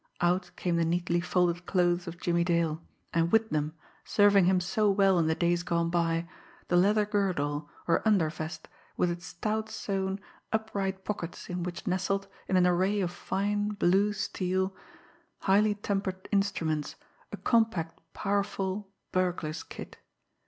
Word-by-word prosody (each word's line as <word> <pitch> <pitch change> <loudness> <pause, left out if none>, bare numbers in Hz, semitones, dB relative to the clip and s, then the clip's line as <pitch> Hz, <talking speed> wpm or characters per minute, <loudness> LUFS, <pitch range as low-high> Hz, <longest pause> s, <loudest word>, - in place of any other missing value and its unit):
Out 180 +1 +1
came 175 -2 0
the 170 - +3
neatly 170 +1 +1
folded 180 -1 +1
clothes 175 -1 +2
of 170 +1 -7
Jimmie 170 0 +1
Dale; 170 -2 +1 0.3
and 165 0 +2
with 225 0 +3
them, 155 +1 -1 0.3
serving 205 -2 +5
him 185 0 +4
so 205 +4 +1
well 195 -2 +4
in 160 - +2
the 160 - +2
days 175 0 +1
gone 170 -1 0
by, 165 -1 +1 0.4
the 180 - +2
leather 205 +4 +4
girdle, 160 -8 -1 0.2
or 165 - +3
undervest, 160 -6 0 0.3
with 180 - +2
its 175 -1 -6
stout 215 +6 -2
sewn, 195 -1 -2 0.3
upright 200 -3 -2
pockets 180 -4 -5
in 180 0 -2
which 175 0 -5
nestled, 195 +2 0 0.2
in 185 - +2
an 180 - +5
array 185 +3 +2
of 180 -3 0
fine, 205 +3 -1
blue 195 +2 +3
steel, 190 -1 -1 0.7
highly 205 +2 +3
tempered 195 -2 -3
instruments, 170 -7 0 0.4
a - - -5
compact 220 -9 +1
powerful 200 -1 -1 0.2
burglar's 175 -4 -1
kit. - - -10
180 Hz, 145 wpm, -29 LUFS, 170-200 Hz, 0.7 s, serving